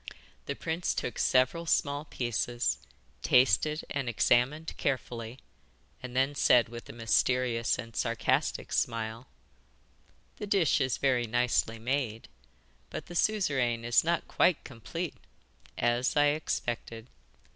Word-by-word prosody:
The 140 - -2
prince 165 +3 -2
took 120 - -3
several 130 +7 +2
small 145 -1 +1
pieces, 120 -2 -1 0.4
tasted 130 +5 +3
and 135 -3 -3
examined 125 +7 +1
carefully, 120 -3 -3 0.6
and 125 -1 -8
then 135 +2 +2
said 125 -4 +4
with 120 0 -9
a - - -5
mysterious 120 +1 +1
and 115 -1 -8
sarcastic - - 0
smile: 115 +2 -2 1.1
'The 210 - -6
dish 190 -7 +2
is 130 -3 0
very 125 -3 +1
nicely 120 -1 +1
made, 120 -1 -2 0.6
but - - -6
the 175 - -10
Suzeraine 135 - +1
is 120 0 +4
not 170 0 0
quite 175 -2 +2
complete 155 +8 -6 0.6
as 120 +4 +1
I 145 0 +5
expected. 120 -6 -3
125 Hz, 120 wpm, -29 LUFS, 120-145 Hz, 1.1 s, I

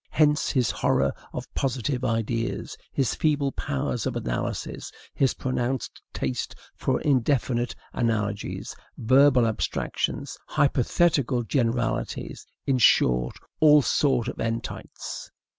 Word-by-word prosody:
Hence 150 -1 +3
his 125 -5 +2
horror 70 0 +1 0.2
of - - -5
positive 130 0 -1
ideas, 115 -1 -1 0.2
his 130 -6 0
feeble 145 -3 +1
powers 70 - -2
of - - -3
analysis, - - -3 0.2
his 135 -2 +2
pronounced 130 -1 -2
taste 65 -1 -3 0.2
for - - 0
indefinite 125 -3 +1 0.2
analogies, 105 -3 -2 0.2
verbal 130 +1 +5
abstractions, 110 -1 -2
hypothetical 140 -2 +2
generalities, 120 -1 -1 0.2
in 135 -2 +2
short, 60 - +4 0.2
all 150 -2 +7
sorts 135 -5 +2
of - - -6
entites. 115 0 -5
125 Hz, 105 wpm, -26 LUFS, 115-140 Hz, 0.2 s, all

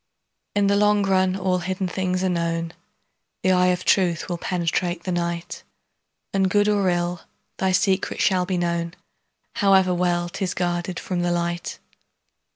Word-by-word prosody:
In 205 -1 +3
the 200 0 +3
long 210 0 +3
run 190 -1 +2
all 185 -1 0
hidden 185 +1 -2
things 185 0 -1
are 190 - +1
known, 165 -1 -2 0.7
The 185 - +3
eye 180 0 +4
of 180 0 0
truth 175 -4 +2
will 175 -1 -3
penetrate 175 0 -1
the 185 - -3
night, 170 -1 -3 0.7
And 190 -1 +2
good 205 +2 +3
or 200 -3 +2
ill, 175 0 -1 0.4
thy 190 0 +1
secret 190 +1 +1
shall 185 -2 +2
be 185 -1 -1
known, 170 0 -2 0.6
However 190 -2 +4
well 175 -1 0
'tis 190 0 -3
guarded 175 0 -2
from 180 -2 -3
the 175 0 0
light. 175 0 -2
180 Hz, 160 wpm, -23 LUFS, 175-190 Hz, 0.7 s, eye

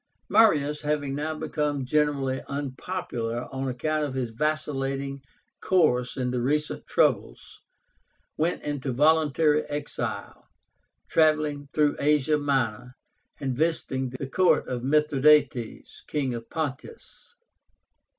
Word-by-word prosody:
Marius 150 -9 +4
having 145 -2 -1
now 155 +3 -2
become 150 -3 -2
generally 140 -2 0
unpopular 130 -4 -4
on 135 0 -3
account 155 +5 -1
of 140 -3 -3
his 125 -3 -2
vacillating 140 0 -2 0.4
course 130 -10 +2
in 125 -1 -1
the 125 -1 -1
recent 150 +4 -1
troubles, - - 0 0.8
went 165 +3 -1
into 145 -3 -3
voluntary 155 +1 +3
exile, 145 0 -5 0.6
travelling 155 -3 +2
through 150 -1 +2
Asia 150 +1 +2
Minor, 125 -4 -1 0.4
and 135 -3 -2
visiting 135 -4 -1
the 130 +2 -6
court 180 +7 +2
of 125 -1 -3
Mithradátes, 150 -2 +2
King 140 -4 -1
of 115 -1 -7
Pontus. 160 - -6
145 Hz, 110 wpm, -26 LUFS, 130-150 Hz, 0.8 s, Marius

